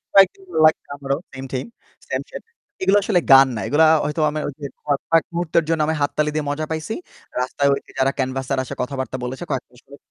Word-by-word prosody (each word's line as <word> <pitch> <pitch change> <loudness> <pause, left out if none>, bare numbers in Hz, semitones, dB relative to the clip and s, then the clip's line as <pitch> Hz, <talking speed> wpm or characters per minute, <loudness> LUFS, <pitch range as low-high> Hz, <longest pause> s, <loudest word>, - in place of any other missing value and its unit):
Like, 195 -2 +8 0.3
like 155 0 +6 0.2
আমারও 140 -1 -2 0.2
maintain 130 -1 -5 0.4
sunset - - -4 0.4
এগুলো 190 +2 +4
আসলে 195 -3 +2
গান 135 0 +9
না 110 - -3
এগুলা 155 +2 +4
আ - - +6
হয়তো 150 +2 -1
আমার 155 +1 -3 0.4
ক - - -44 0.3
কয়েক 165 -1 +4
মুহূর্তের 170 -1 +1
জন্য 165 -1 +2
আমি 160 - +1
হাততালি 150 +1 +1
দিয়ে 155 -1 -1
মজা 150 +2 -2
পাইছি। 160 +6 -3 0.5
রাস্তায় 140 +2 +1
ওই - - -1
যে - - -17
যারা 135 +1 +3
ক্যানভাসের 130 0 -1
আশায় 130 - -8
কথাবার্তা 130 -1 -3
বলেছে 130 +6 -4
কয়েক 130 - -1
মাস 125 0 -19
পরে 140 +1 -14
145 Hz, 195 wpm, -21 LUFS, 130-160 Hz, 0.5 s, গান